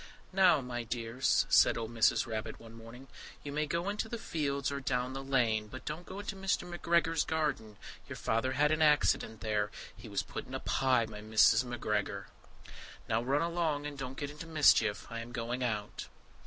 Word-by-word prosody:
"Now, 185 -6 +5
my 125 -1 -4
dears," 115 +2 0
said - - +5
old 115 0 -5
Mrs. 115 -1 +3
Rabbit 110 -1 -5
one 115 -1 -13
morning, 115 +3 -12 0.4
"you 145 - -5
may 150 +1 -1
go 170 +4 -2
into 210 +2 -2
the 235 - -4
fields 140 - -2
or 140 - -3
down 125 -1 -1
the 135 0 -5
lane, 115 -6 +1
but 130 +5 -10
don't 155 +4 -5
go 195 - -7
into 205 -1 -5
Mr. 195 -1 -1
McGregor's 170 -2 +1
garden: 145 -10 -2 0.3
your - - -5
Father 115 +4 0
had 150 +3 +3
an 155 0 +1
accident 145 -7 +3
there; 105 -1 0 0.3
he - - -11
was - - -1
put - - -7
in - - -6
a - - -2
pie 130 -3 +2
by 105 -1 -9
Mrs. 110 +2 +4
McGregor." 105 -4 -2 0.8
"Now 110 +1 +1
run 140 +6 +1
along, 165 -4 -1
and 145 -1 -5
don't 130 -1 -6
get 145 -1 -4
into 150 +2 -9
mischief. 130 -9 +4
I 115 - -4
am 115 +1 -8
going 120 +1 -3
out." 105 -4 -3
130 Hz, 195 wpm, -32 LUFS, 115-155 Hz, 0.8 s, Now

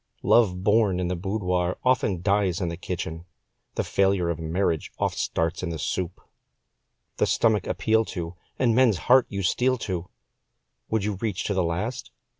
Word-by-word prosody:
Love 95 -6 +3
born 105 -3 +3
in 90 -1 -1
the 90 - -1
boudoir 90 -1 -1
oft 105 -8 +2
dies 100 -2 +2
in 90 -3 -1
the 85 - -4
kitchen, 85 -2 -5 0.5
The - - 0
failure 95 -3 +1
of 85 - -4
marriage 80 0 -1
oft - - -1
starts 80 +2 -1
in 90 - -3
the 85 - -3
soup. 85 +4 -3 1.0
The - - +2
stomach 110 -4 +2
appeal 110 0 +2
to, 85 -3 -5 0.2
and 120 -3 +3
men's 120 -5 +4
heart 125 +6 +4
you 100 -1 -3
steal 130 +8 +2
to 90 -6 -4 0.8
Would 110 -2 0
you 105 -2 -2
reach 105 -2 -2
to 100 - -1
the 95 - +1
last? 105 +10 -2
95 Hz, 170 wpm, -25 LUFS, 85-110 Hz, 1.0 s, men's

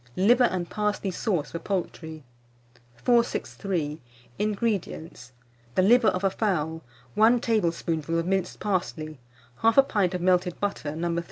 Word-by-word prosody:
LIVER 240 +7 +5
AND 180 -5 -1
PARSLEY 210 -1 -1
SAUCE 180 -5 -2
FOR 170 - -4
POULTRY. 165 -5 -4 0.7
463. 185 - 0 0.4
INGREDIENTS. 200 - -2 0.4
The 185 - +4
liver 235 +3 +5
of 185 - +1
a 195 - +2
fowl, 160 -7 -1 0.3
one 225 +3 +5
tablespoonful 165 -7 0
of 165 - 0
minced 190 -1 -1
parsley, 165 -7 -3 0.4
1/2 250 +5 +5
pint 190 -4 +1
of 180 - -3
melted 180 -1 +1
butter, 175 -7 -3
No. 170 +1 -1
185 Hz, 125 wpm, -26 LUFS, 165-210 Hz, 0.7 s, LIVER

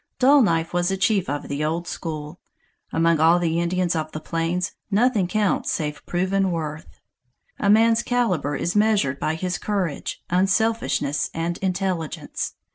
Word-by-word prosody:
Dull 275 +2 +6
Knife 165 -7 +1
was 175 +1 +1
a 195 - -1
chief 195 -3 +1
of 145 +1 -3
the 145 +1 -3
old 165 +3 -2
school. 155 -1 -6 0.5
Among 165 0 +2
all 165 +2 +5
the 170 -1 0
Indians 175 0 0
of 155 -1 -3
the 155 - -4
plains, 165 +3 -2 0.2
nothing 215 -2 +2
counts 210 0 0
save 150 -2 -3
proven 190 +2 +1
worth. 155 -2 -5 0.6
A 200 - +1
man's 225 +2 +5
caliber 185 - 0
is 175 +6 -2
measured 205 -11 +2
by 155 - -1
his 180 +2 -3
courage, 190 -8 -3
unselfishness 190 -6 +1
and 170 +1 -2
intelligence. 185 -4 -3
175 Hz, 150 wpm, -23 LUFS, 160-200 Hz, 0.6 s, Dull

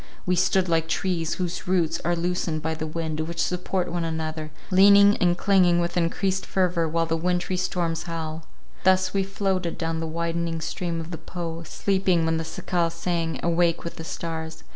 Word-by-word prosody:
We 180 - +2
stood 185 +1 +2
like 165 -1 +1
trees, 165 -1 -1
whose 180 -1 -3
roots 180 -3 +1
are 175 +1 +1
loosened 170 -2 -1
by 160 +1 0
the 155 0 -4
wind, 155 -1 -3
which 165 +2 -4
support 180 0 -1
one 175 -1 -1
another, 160 -1 -3 0.2
leaning 200 +2 +7
and 175 -1 +2
clinging 180 -3 +4
with 175 0 -1
encreased 185 +2 0
fervour 175 -3 +1
while 165 +1 +1
the 165 0 0
wintry 180 +2 0
storms 175 -2 -1
howl. 160 -1 -4 0.4
Thus 185 0 +3
we 195 - +2
floated 190 -3 -1
down 165 -1 -2
the 165 - -3
widening 170 0 -2
stream 170 +1 -3
of 165 +1 -6
the 165 - -6
Po, 170 -2 -5
sleeping 190 -1 +1
when 160 0 +1
the 160 - -2
cicale 170 +1 -1
sang, 170 -1 -2
awake 170 0 +2
with 170 - -6
the 165 - -6
stars. 160 -1 -5
170 Hz, 185 wpm, -25 LUFS, 165-180 Hz, 0.4 s, leaning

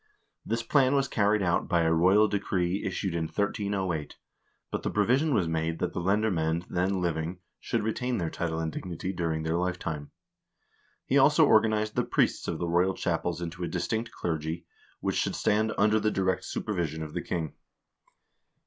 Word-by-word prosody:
This 115 +1 -2
plan 135 +1 +3
was 135 -1 +2
carried 105 -3 +2
out 85 -1 +1
by 85 -1 +2
a 80 0 +3
royal 95 +6 +5
decree 95 -2 -1
issued 95 -1 -2
in 85 -1 -1
1308; 95 -2 -2 0.5
but - - -2
the - - -2
provision 130 +9 +2
was 95 -10 +2
made 80 0 -1
that - - -2
the - - -2
lemhr 105 +4 +2
moend 80 +1 0
then 95 +2 +1
living 85 0 -2 0.2
should 115 -3 -1
retain 125 +3 -1
their 85 -3 -2
title 80 -2 -2
and 80 -1 -2
dignity 90 +3 -5
during 80 -3 -1
their 80 +1 0
lifetime. 85 -5 -3 1.0
He - - +3
also - - +6
organized 110 -1 +3
the - - +2
priests - - +1
of - - -2
the 85 - -2
royal 90 +3 +2
chapels 85 0 -1
into 85 +1 -5
a - - -1
distinct 90 +8 -2
clergy, 80 -2 -3 0.4
which - - -1
should - - 0
stand 110 +1 +1
under 105 +1 +4
the 110 0 +1
direct 95 -2 0
supervision 80 -6 -2
of 75 -1 -8
the - - -2
king. 80 -3 -3
90 Hz, 175 wpm, -28 LUFS, 80-105 Hz, 1.0 s, also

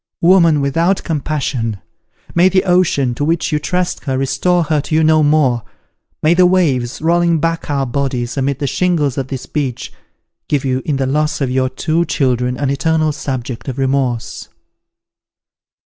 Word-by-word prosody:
woman 170 -4 +4
without 165 +7 +1
compassion! 140 - -2 0.6
may 175 +2 +4
the 190 0 +2
ocean, 175 -9 +2
to 130 - -3
which 165 +2 0
you 150 - +1
trust 180 +3 -2
her, 130 -1 -1
restore 140 +7 +1
her 155 -1 0
to 150 +2 -3
you 160 - +3
no 155 0 +4
more! 145 -5 +2 0.6
May 155 +2 +4
the 180 +1 +5
waves, 145 -9 0
rolling 170 0 +2
back 165 0 -2
our 140 -2 0
bodies 125 -1 -2
amid 135 -1 -1
the 145 - -3
shingles 155 -3 0
of 130 - -3
this 135 -2 -6
beach, 135 -6 -4 0.5
give 145 -2 0
you 130 0 0
in 150 - 0
the 135 0 -1
loss 150 +3 0
of 135 -3 -1
your 130 0 +1
two 155 +5 0
children, 125 -4 0
an 140 -2 -1
eternal 155 +2 +1
subject 130 -4 -5
of 130 -1 -4
remorse!" 130 -3 -2
145 Hz, 165 wpm, -16 LUFS, 130-165 Hz, 0.6 s, the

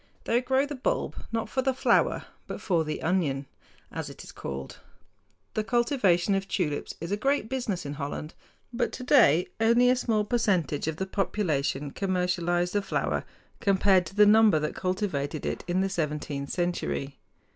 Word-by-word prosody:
They 235 +2 +2
grow 265 +2 +2
the 290 - -6
bulb 260 - -1 0.2
not 225 -1 -1
for 260 - -1
the 260 0 0
flower - - +2 0.2
but - - -5
for 170 -5 +1
the 155 0 -4
"onion," 155 -6 0 0.5
as - - -5
it - - -10
is - - -11
called. 65 0 -7 0.7
The 215 - 0
cultivation 215 -6 +2
of 195 0 -1
tulips 145 -1 -2
is 170 +3 -5
a - - +2
great 270 0 +1
business 240 - -2
in 140 - -4
Holland; 145 +2 -5 0.4
but 235 0 0
today 245 - +4
only 235 +2 +5
a - - +4
small 225 -4 +1
percentage 185 - 0
of 160 - -1
the 190 - -2
population 150 -8 -1
commercialize 180 -1 0
the 205 - +1
flower, 195 - -1 0.3
compared 190 -2 +3
to 195 - -11
the 210 0 +7
number 215 -3 +6
that 150 0 -2
cultivated 180 -6 -2
it - - -3
in 180 +1 +1
the 195 - +1
seventeenth 150 -5 -3
century. 175 -6 -2
190 Hz, 165 wpm, -27 LUFS, 155-225 Hz, 0.7 s, the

